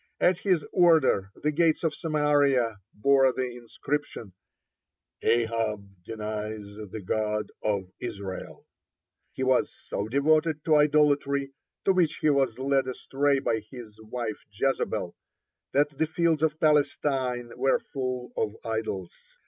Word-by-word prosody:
At 180 0 +3
his 185 -7 +1
order 160 - +4
the 150 - -1
gates 160 +1 +2
of 160 -2 +1
Samaria 145 -8 +2
bore 135 +3 +4
the 125 -1 -3
inscription: 120 -2 -4 0.9
"Ahab 110 -4 0
denies 105 0 -5 0.2
the 105 +1 -7
God 105 +1 -1
of 100 -3 -1
Israel." 100 -5 -6 0.7
He 130 - -3
was 130 -1 +2 0.2
so 100 - -2
devoted 155 +4 +2
to 155 - +4
idolatry, 145 -2 +3 0.3
to 195 - +5
which 175 -4 +2
he 155 - +3
was 135 -5 +1
led 135 0 +1
astray 140 +2 0
by 115 -4 0
his 110 0 -11
wife 110 -1 -4
Jezebel, 135 +6 -1 0.6
that 145 +1 +2
the 160 +3 0
fields 160 -1 +1
of 155 -1 +1
Palestine 135 -5 +1
were 135 - +2
full 130 -2 -4
of 105 0 -1
idols. 110 -5 -3
135 Hz, 125 wpm, -27 LUFS, 110-150 Hz, 0.9 s, to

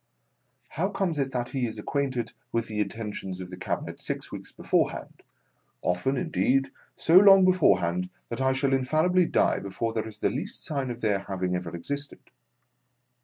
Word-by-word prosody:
How 185 +6 -1
comes 195 -6 -1
it 135 -1 0
that 120 -2 -3
he 130 -3 -1
is 110 - -6
ac 105 - -7
quainted 135 -4 -2 0.2
with 115 0 -1
the 110 -1 -4
intentions 105 -3 -4
of 90 -1 -7
the - - -6
Cabinet 90 - -4
six - - -4
weeks - - -8
beforehand - - -1 0.3
— - - -44
often, 90 +10 0
indeed, 135 -5 +1 0.2
so 165 +2 +5
long 195 -1 +8
beforehand 90 - +3 0.2
that 120 +2 -4
I 130 0 +3
shall 135 +1 +1
infallibly 155 +7 +3
die - - +2
before 105 +4 -3
there 110 -1 -2
is 110 -1 -10
the - - +1
least - - -4
sign 140 -4 -2
of 120 0 -6
their 105 -3 +2
having 95 -2 -2
ever 90 -1 -4
existed 140 +11 -5
125 Hz, 175 wpm, -27 LUFS, 100-140 Hz, 0.3 s, long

